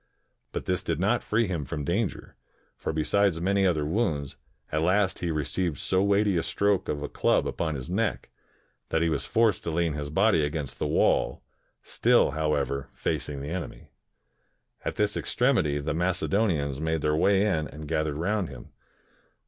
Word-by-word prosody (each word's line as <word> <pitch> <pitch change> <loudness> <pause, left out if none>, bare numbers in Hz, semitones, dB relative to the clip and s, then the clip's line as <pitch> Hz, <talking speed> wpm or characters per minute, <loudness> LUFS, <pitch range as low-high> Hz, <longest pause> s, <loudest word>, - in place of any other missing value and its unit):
But - - -4
this 90 - 0
did 85 -2 -2
not 105 +6 +2
free 115 +2 +1
him 85 -6 -2
from 75 +2 -4
danger; 95 +7 -2 0.4
for - - -3
be 80 -1 -1
sides 100 -1 +2
many 95 +2 +2
other 80 -4 +1
wounds, 75 - -1 0.4
at 75 - 0
last 95 +3 +2
he 85 - -2
received 80 +1 -1
so 95 +7 +1
weighty 100 -1 +3
a - - +2
stroke 100 +3 0
of 75 -1 -2
a - - -2
club - - +1
upon 80 -2 -2
his 65 0 -6
neck, 105 +5 -1 0.6
that 80 - +1
he 85 - +2
was 75 -3 -1
forced 115 -2 +2
to - - -1
lean 85 -1 0
his 75 -1 -4
body 95 0 +3
against 75 -1 -3
the - - 0
wall, - - +2 0.4
still, - - +3
however, 70 -3 -1
facing 70 -2 -2
the 70 - -5
enemy. 90 -1 -6 0.9
At - - -3
this 105 0 0
extremity, 105 - +1
the 75 +1 -2
]Macedonians 85 -4 0
made 80 -1 0
their 75 0 +1
way 100 +5 +3
in 80 -7 0
and 75 0 -9
gathered 80 -2 -1
roimd 95 +3 -1
him. 65 -3 -11
85 Hz, 175 wpm, -27 LUFS, 75-100 Hz, 0.9 s, weighty